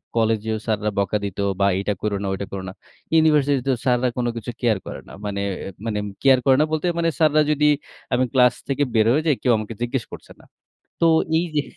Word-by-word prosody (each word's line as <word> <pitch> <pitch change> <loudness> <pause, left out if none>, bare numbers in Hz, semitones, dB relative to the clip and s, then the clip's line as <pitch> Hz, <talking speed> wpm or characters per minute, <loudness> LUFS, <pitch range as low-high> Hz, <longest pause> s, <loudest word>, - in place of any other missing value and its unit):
কলেজেও 110 -1 +1
স্যাররা 105 -1 0
বকা 100 +2 +1
দিত 100 -2 -5 0.2
বা 100 - +4
"এটা 100 +1 -1
করো 105 -1 -1
না - - -2
ঐটা 95 +1 -4
করো 95 -1 -5
না।" - - -9 0.4
ইউনিভার্সিটিতেও 145 -4 +3
স্যাররা 125 0 +2
কোনো 120 -1 0
কিছু 115 +1 -5
কেয়ার 115 -4 +2
করে - - -7
না। - - -12
মানে, 100 -1 -3 0.4
মানে 110 -2 -2 0.3
কেয়ার 135 -2 +6
করে 135 - +6
না - - +4
বলতে 155 +1 -1
মানে, 165 0 +2
স্যাররা 155 -1 +4
যদি, 150 0 +2 0.5
আমি 125 +1 +3
ক্লাস 125 -2 +5
থেকে 140 +1 0
বের 110 -2 +4
হয়ে 155 +3 +1
যাই, 150 - +4
কেউ 125 - +2
আমাকে 110 +1 -5
জিজ্ঞেস 120 0 -1
করছে - - -11
না। - - -19 0.5
তো - - +3 0.3
এই 170 - +1
যে 150 - +3
125 Hz, 210 wpm, -22 LUFS, 105-145 Hz, 0.5 s, কেয়ার